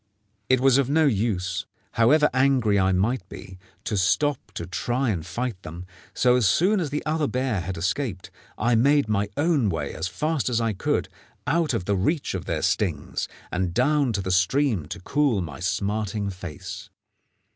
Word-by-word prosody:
It 130 0 +4
was 135 0 +5
of 135 -2 +1
no 155 +2 +3
use, 95 -6 0 0.2
however 135 +6 +4
angry 130 -6 +3
I 95 0 +3
might 100 +2 0
be, 95 0 -10 0.2
to 105 - -2
stop 140 +9 +1
to 85 - -5
try 120 +7 -1
and 85 -6 -3
fight 115 +3 -4
them; 85 +1 -8 0.3
so 125 -1 +4
as 125 -5 +3
soon 190 - +3
as 165 -5 -2
the 145 +1 -3
other 155 -1 0
bear 125 -5 -1
had 90 +1 -5
escaped 95 - -2 0.3
I 120 +3 +1
made 140 +4 +4
my 105 -1 0
own 145 -8 +2
way 80 -5 -3
as - - -3
fast 150 - -1
as 120 -2 +1
I 115 -2 0
could 95 - -1 0.4
out 165 -1 +1
of 90 - -2
the 100 - +1
reach 140 - 0
of - - -4
their - - -2
stings, 85 -9 -1 0.2
and 90 -1 -2
down 140 0 +2
to 100 -2 -2
the 95 - -2
stream 95 - +2
to 100 +4 -6
cool 140 0 +1
my 80 -7 -5
smarting 100 +3 -1
face. 90 -5 -8
110 Hz, 180 wpm, -25 LUFS, 95-135 Hz, 0.4 s, was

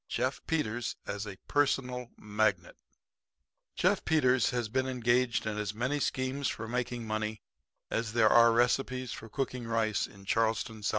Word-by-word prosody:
JEFF - - -1
PETERS 120 -7 -1
AS 100 +1 -4
A 100 -2 -7
PERSONAL 125 -4 0
MAGNET 105 -4 0 1.0
Jeff - - +2
Peters 130 -6 +3
has 120 -3 -1
been 130 +4 0
engaged 125 -1 +1
in 105 -1 -2
as 105 0 -3
many 125 +6 0
schemes 130 0 -1
for 115 - -4
making 120 0 -2
money 110 0 -3 0.5
as 115 -1 -1
there 115 -2 +5
are 115 0 +7
recipes 125 +1 +1
for 115 - -8
cooking 125 -1 -3
rice 115 -2 +1
in 100 -1 -16
Charleston, 115 +1 0
S.C. 105 - -1
115 Hz, 155 wpm, -31 LUFS, 110-125 Hz, 1.0 s, are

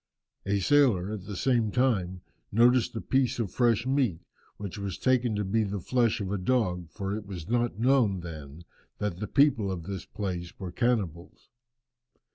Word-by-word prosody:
A 100 0 +1
sailor, 110 -7 +3
at 100 -4 -6
the 100 -1 -6
same 120 0 +1
time, 95 -8 0 0.3
noticed 120 +2 +4
a 110 - -3
piece 130 -1 +1
of 110 -7 -2
fresh 115 -2 +2
meat, 130 -11 +1 0.4
which 100 -1 -6
was 100 -2 -4
taken 125 -3 +2
to 105 0 -1
be 110 +4 +1
the 100 -1 -3
flesh 120 +4 +1
of 100 -2 -3
a 100 - -1
dog, 90 -6 0
for 100 +2 -4
it 105 -1 -7
was 90 -5 -7
not 120 -2 0
known 115 -6 +3
then 80 -2 -9 0.3
that 100 -4 -3
the 105 - -3
people 125 -7 +3
of 90 -3 -4
the 95 +2 -5
place 90 -4 -4
were 95 -2 -5
cannibals. 100 -7 -2
105 Hz, 175 wpm, -28 LUFS, 95-120 Hz, 0.4 s, noticed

